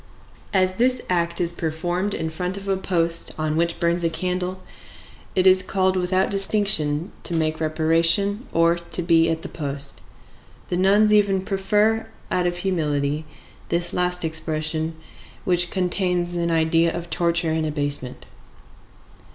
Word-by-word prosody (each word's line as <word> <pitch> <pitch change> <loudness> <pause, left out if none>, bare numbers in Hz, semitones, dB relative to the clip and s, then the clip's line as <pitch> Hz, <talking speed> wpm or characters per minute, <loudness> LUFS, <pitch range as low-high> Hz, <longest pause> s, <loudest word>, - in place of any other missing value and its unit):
As 185 -1 +2
this 255 +1 +2
act 170 -1 0
is 170 -1 +1
performed 175 +4 -2
in 160 0 -3
front 180 +4 -3
of 200 0 -8
a 195 - +1
post 170 -3 -1
on 155 -1 -1
which 170 +1 0
burns 170 0 +1
a 165 - +2
candle, 180 +2 -3 0.7
it 185 - +2
is 185 0 +7
called 185 0 0
without 185 +1 +1
distinction, 195 -6 +2
to 170 - -1
make 155 -1 0
reparation 165 - +2
or 165 0 +3
to 170 +1 -4
be 165 -1 +3
at 165 0 -2
the - - -4
post. 140 -2 -2 0.7
The 175 - -1
nuns 205 +3 +4
even 200 -2 +3
prefer, 210 +3 +1 0.2
out 180 -1 +1
of 175 0 -2
humility, 150 -5 -1 0.4
this 170 0 +1
last 180 -1 +1
expression, 160 0 -1 0.5
which 175 -1 +2
contains 180 -1 -1
an 170 0 -1
idea 165 0 +2
of 170 0 -7
torture 170 -1 0
and 160 0 -1
abasement. 145 -4 -3
175 Hz, 145 wpm, -22 LUFS, 160-185 Hz, 0.7 s, is